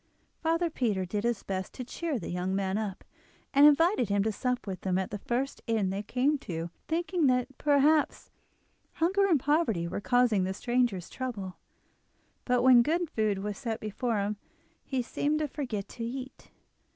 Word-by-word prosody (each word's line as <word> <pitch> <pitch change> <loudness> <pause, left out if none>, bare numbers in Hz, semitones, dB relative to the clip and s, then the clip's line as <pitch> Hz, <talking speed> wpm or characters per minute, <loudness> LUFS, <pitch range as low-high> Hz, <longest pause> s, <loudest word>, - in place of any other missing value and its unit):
Father 330 +1 +1
Peter 210 -10 0
did 205 +3 -3
his 235 -3 0
best 190 -1 -4
to 255 - -5
cheer 305 +4 -3
the 175 - -5
young 180 +2 -1
man 195 -1 -1
up, 210 -3 -3 0.5
and 285 +1 +8
invited 300 - +4
him 200 0 +2
to 220 - 0
sup 250 +4 -2
with 190 -3 -6
him 185 -1 +1
at 190 - -2
the 205 - -4
first 255 +6 -2
inn 215 -5 +1
they 195 +1 -2
came 260 +7 +1
to, 165 -6 -5 0.2
thinking 340 -1 +1
that 250 +1 +1
perhaps 295 +1 +2 0.6
hunger 385 +4 +2
and 330 -7 +4
poverty 265 - +1
were 185 - -4
causing 245 -5 +3
the 190 +1 -2
stranger's 240 -6 0
trouble. 210 -8 -5 0.9
But 250 -1 +2
when 255 -2 +8
good 330 +5 0
food 210 -3 0
was 210 -1 -4
set 230 -4 -3
before 220 +2 -2
him 205 +1 -2 0.5
he 260 -3 -2
seemed 295 +5 0
to 305 -1 -1
forget 245 -9 -4
to 230 - -7
eat. 255 +3 -7
240 Hz, 175 wpm, -29 LUFS, 200-285 Hz, 0.9 s, and